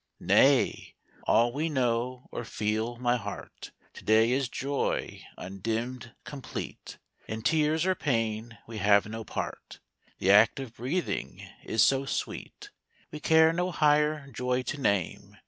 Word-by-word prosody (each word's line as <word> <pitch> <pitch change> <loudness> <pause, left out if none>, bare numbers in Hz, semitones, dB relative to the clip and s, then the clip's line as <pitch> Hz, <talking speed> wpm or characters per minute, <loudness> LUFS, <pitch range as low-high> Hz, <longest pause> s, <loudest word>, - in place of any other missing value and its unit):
Nay! - - +3 0.3
all 120 +1 +4
we 155 +4 -1
know, 125 -2 -1
or - - -4
feel, 110 +2 -2
my 120 0 +1
heart, 100 -3 -8 0.2
To - - -12
day 110 +2 +4
is 130 -1 0
joy 140 +2 -2 0.2
undimmed, 115 +6 -4
complete; 140 -3 -7 0.3
In 110 0 -5
tears 155 +2 +2
or 190 - +3
pain 115 - -2
we 110 -2 -7
have 100 +1 +4
no 110 +1 -6
part; - - -6 0.4
The 95 - +2
act 105 +5 +6
of 130 -4 -7
breathing 145 +10 -3 0.2
is 110 - +2
so 135 0 +3
sweet, - - -5 0.4
We 150 - -6
care 160 +1 +5
no 180 +2 0
higher 150 -2 +2
joy 125 0 -1
to 145 +2 -5
name. 100 -8 -1
125 Hz, 140 wpm, -28 LUFS, 110-145 Hz, 0.4 s, act